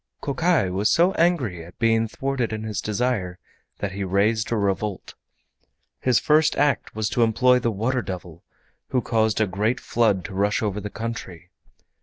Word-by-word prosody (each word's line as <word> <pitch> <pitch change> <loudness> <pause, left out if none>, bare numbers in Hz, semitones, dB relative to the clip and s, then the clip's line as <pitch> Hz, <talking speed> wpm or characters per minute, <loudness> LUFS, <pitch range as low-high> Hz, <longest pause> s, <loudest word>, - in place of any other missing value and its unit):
Kokai 145 - +1
was 100 +4 +1
so 170 +7 +4
angry 140 - 0
at 85 +2 -14
being 115 0 +2
thwarted 135 0 -2
in 110 0 -4
his 110 -2 -3
desire 105 -5 -1 0.4
that 100 - -3
he 100 +1 -4
raised 105 +5 +1
a 115 - +1
revolt. 100 -1 -2 0.9
His 125 -2 +2
first 155 +1 +3
act 145 -6 +1
was 110 -1 -1
to 120 - 0
employ 125 +3 +4
the 120 - 0
Water 115 +5 -1
Devil, 90 -4 -8 0.4
who 125 -2 0
caused 110 -2 +1
a 110 - +3
great 105 +6 -1
flood 105 -6 +1
to - - -7
rush 100 +3 0
over 105 -1 -1
the 105 - -5
country. 95 -7 -7
110 Hz, 170 wpm, -23 LUFS, 100-125 Hz, 0.9 s, so